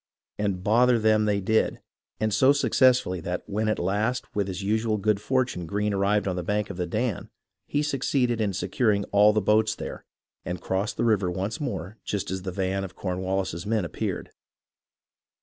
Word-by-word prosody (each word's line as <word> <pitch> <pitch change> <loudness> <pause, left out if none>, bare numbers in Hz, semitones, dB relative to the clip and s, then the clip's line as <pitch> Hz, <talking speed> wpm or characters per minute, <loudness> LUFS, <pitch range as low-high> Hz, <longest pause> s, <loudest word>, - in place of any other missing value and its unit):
And 100 -3 -1
"bother" 120 +4 +4
them 110 -1 +3
they 105 -1 +1
did, 110 +3 +1 0.4
and 110 -1 0
so 135 +5 +5
successfully 125 -9 +3
that 90 +2 -3
when 110 +2 -1
at 110 - +1
last 105 +7 0
with 100 -1 0
his 95 0 -4
usual 110 +2 +1
good 105 0 +1
fortune 125 -9 -1
Greene 105 +4 -1
arrived 100 +1 +1
on 95 - -1
the 90 - -2
bank 105 +3 -1
of 95 - -8
the 90 -1 -2
Dan, 110 +2 -2 0.4
he 145 +1 0
succeeded 130 -4 0
in 105 -2 +1
securing 105 -1 +1
all 105 +1 +6
the 105 0 +1
boats 110 +2 +3
there, - - -7 0.4
and 90 0 -4
crossed 95 +4 -2
the 120 - +1
river 100 -5 +2
once 95 - -3
more 100 - -4
just 100 -2 -3
as 95 0 -3
the 95 0 -4
van 95 +1 -1
of 95 -2 -8
Cornwallis's 95 -1 -2
men 110 -4 +1
appeared. 85 - -4
105 Hz, 185 wpm, -26 LUFS, 95-110 Hz, 0.4 s, all